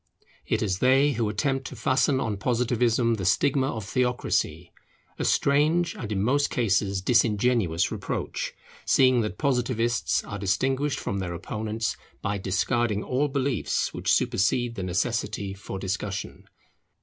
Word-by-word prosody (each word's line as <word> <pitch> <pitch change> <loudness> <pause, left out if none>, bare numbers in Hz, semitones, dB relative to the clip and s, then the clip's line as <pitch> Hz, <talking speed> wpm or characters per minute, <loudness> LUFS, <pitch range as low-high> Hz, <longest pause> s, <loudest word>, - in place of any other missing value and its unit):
It 110 +1 0
is 95 -3 -1
they 135 +3 +4
who 115 -4 -1
attempt 135 +5 -1
to - - -9
fasten 130 +4 +2
on 110 -6 -2
Positivism 120 0 +1
the 95 - -4
stigma 135 +8 +2
of 110 -7 -4
theocracy: 115 -9 -1 0.5
a - - -1
strange 155 +5 +2
and 110 -3 -6
in 100 -2 0
most 140 +5 +2
cases 100 -4 0
disingenuous 115 -6 +2
reproach, - - -3 0.3
seeing 130 -2 +4
that 105 - -3
Positivists 120 -4 0
are 100 - -6
distinguished 135 +9 0
from 100 - -3
their 90 -2 -3
opponents 110 +5 -3 0.2
by 100 0 -2
discarding 105 +3 0
all 135 +3 0
beliefs 135 -4 -1
which - - -1
supersede 120 +5 +1
the 105 - -5
necessity 100 +1 -2
for 95 0 -7
discussion. 95 +1 -4
115 Hz, 135 wpm, -26 LUFS, 100-130 Hz, 0.5 s, they